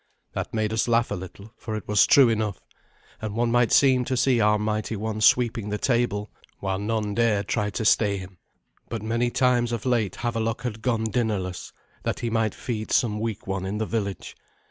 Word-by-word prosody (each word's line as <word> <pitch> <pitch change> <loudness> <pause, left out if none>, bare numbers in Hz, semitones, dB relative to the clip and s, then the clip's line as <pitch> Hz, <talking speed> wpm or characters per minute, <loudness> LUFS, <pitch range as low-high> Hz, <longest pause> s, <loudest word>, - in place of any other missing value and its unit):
That - - -4
made 110 -1 -1
us 110 - +1
laugh 115 0 +2
a - - 0
little, 100 +4 -10
for 110 -2 -5
it 105 - -6
was 105 -3 +4
true 135 -3 +7
enough; 110 -4 -1 0.6
and 110 -1 -4
one 115 0 +1
might 120 -1 +3
seem 130 -2 +5
to 130 - -1
see 125 -2 +3
our 105 0 +4
mighty 105 +1 -2
one 110 +1 -3
sweeping 115 -2 +3
the 105 - -1
table, 115 -4 0 0.3
while 95 -1 -2
none 105 0 -1
dared 105 -3 +1
try 105 -3 0
to 105 +2 -3
stay 105 -2 +3
him. 95 -2 -10 0.5
But 115 -3 -4
many 115 +2 0
times 120 -1 +2
of 115 -1 -3
late 115 -7 +1
Havelok 115 -1 -2
had 115 -3 -4
gone 115 -3 0
dinnerless, 105 -5 -2 0.3
that - - -3
he 115 - -2
might 110 -2 0
feed 110 -3 -4
some 105 -3 +1
weak 110 -1 -4
one 95 -1 -3
in 95 +2 -3
the 110 - -1
village. 100 -3 -4
110 Hz, 200 wpm, -25 LUFS, 105-120 Hz, 0.6 s, true